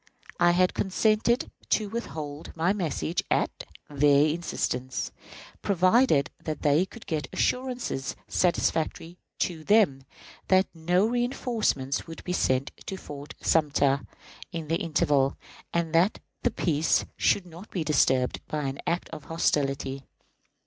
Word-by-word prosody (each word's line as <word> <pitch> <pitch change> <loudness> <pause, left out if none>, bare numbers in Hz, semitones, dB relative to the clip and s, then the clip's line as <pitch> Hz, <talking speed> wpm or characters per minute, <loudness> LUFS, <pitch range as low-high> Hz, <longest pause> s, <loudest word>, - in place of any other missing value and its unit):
I 175 0 +6
had 180 +1 +3
consented 215 +4 +1 0.2
to 215 - +2
withhold 160 -10 -6
my 170 +4 +2
message 170 -3 -1
at - - 0 0.2
their 145 0 +4
instance, 130 -6 -2 0.5
provided 185 - +3
they 155 +2 +1
could 230 - -13
get 155 -4 -2
assurances 250 - -1
satisfactory 170 -1 0 0.2
to 165 -3 -1
them 200 -9 +4 0.5
that 190 0 +5
no 175 +5 +2
reënforcements 235 - -1
would 165 - -9
be 180 - -2
sent 130 -5 +1 0.2
to 190 - -4
Fort 145 -4 -9
Sumter 140 -3 +2 0.5
in 165 -4 -5
the 165 - +2
interval, 145 -4 +1 0.3
and 170 -1 -1
that 175 +5 +4 0.2
the 245 - +2
peace 165 -8 +1
should 195 - +2
not 175 +4 -12
be 175 - -2
disturbed 130 -4 +2
by 150 -1 -2
any 135 0 -3
act 170 +1 0
of 145 - -9
hostility. 140 -4 0
165 Hz, 125 wpm, -27 LUFS, 145-190 Hz, 0.5 s, I